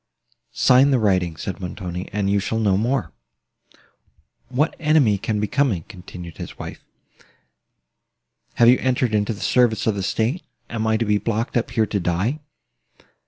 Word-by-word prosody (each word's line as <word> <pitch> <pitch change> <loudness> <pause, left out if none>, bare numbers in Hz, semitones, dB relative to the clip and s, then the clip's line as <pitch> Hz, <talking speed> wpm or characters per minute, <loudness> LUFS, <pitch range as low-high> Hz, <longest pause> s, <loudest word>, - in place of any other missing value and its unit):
"Sign 130 +2 +5
the 135 - +3
writings," 90 -7 0
said 95 - -5
Montoni, 90 0 -6
"and 100 -1 -1
you 100 +1 +2
shall 110 +3 -2
know 105 -4 +2
more." 120 +7 0 1.4
"What 140 +6 0
enemy 150 -10 +3
can 105 +1 -2
be 105 - 0
coming?" 125 - 0
continued 90 -4 -10
his - - -8
wife. - - -8 1.7
"Have 120 - +5
you 125 +2 +6
entered 125 -3 0
into 105 +1 +1
the 100 - -11
service 120 -4 +2
of 110 - +2
the 100 - -3
state? 115 - -1 0.3
Am 110 -1 -2
I 110 0 +2
to 115 - -1
be 105 -1 +2
blocked 115 +2 -2
up 120 0 0
here 115 -2 +1
to 105 -1 -2
die?" 95 - -1
110 Hz, 165 wpm, -22 LUFS, 100-125 Hz, 1.7 s, you